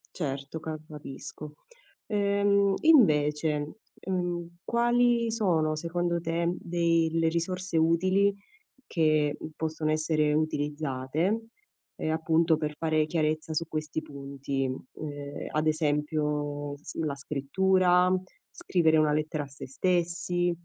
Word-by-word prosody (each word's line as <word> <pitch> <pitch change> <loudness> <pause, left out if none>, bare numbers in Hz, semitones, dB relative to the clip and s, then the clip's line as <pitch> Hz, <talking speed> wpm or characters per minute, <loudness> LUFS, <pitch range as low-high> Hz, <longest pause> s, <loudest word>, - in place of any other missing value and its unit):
Certo 140 -1 -4
ca 160 0 -4
capisco. 150 0 -9 0.5
Ehm, 200 -1 +2
invece, 150 - +4 0.3
mhmm, 175 -2 -1 0.2
quali 240 0 +2
sono 170 -9 +1
secondo 170 +2 -1
te 170 0 -1
dei 170 -1 +1
le 165 0 +2
risorse 180 +1 -2
utili 185 +5 +3 0.5
che 155 -3 +2 0.2
possono 155 -1 -2
essere 155 -1 +1
utilizzate, 150 - -1 0.5
ehm, 155 - -2
appunto 160 0 +2
per 150 -1 -3
fare 155 0 +1
chiarezza 155 0 -1
su 165 +2 0
questi 155 0 -3
punti, 140 -2 -4
mhmm, 130 0 -4 0.3
ehm, 145 0 -6
ad 155 +1 0
esempio 150 -1 -1
s 145 - -11
la 155 -3 -1
scrittura, 180 +6 +2 0.4
scrivere 160 -3 +2
una 155 -1 +3
lettera 155 0 -1
a - - -9
se 140 0 -10
stessi, 175 +3 0
160 Hz, 115 wpm, -28 LUFS, 150-175 Hz, 0.5 s, invece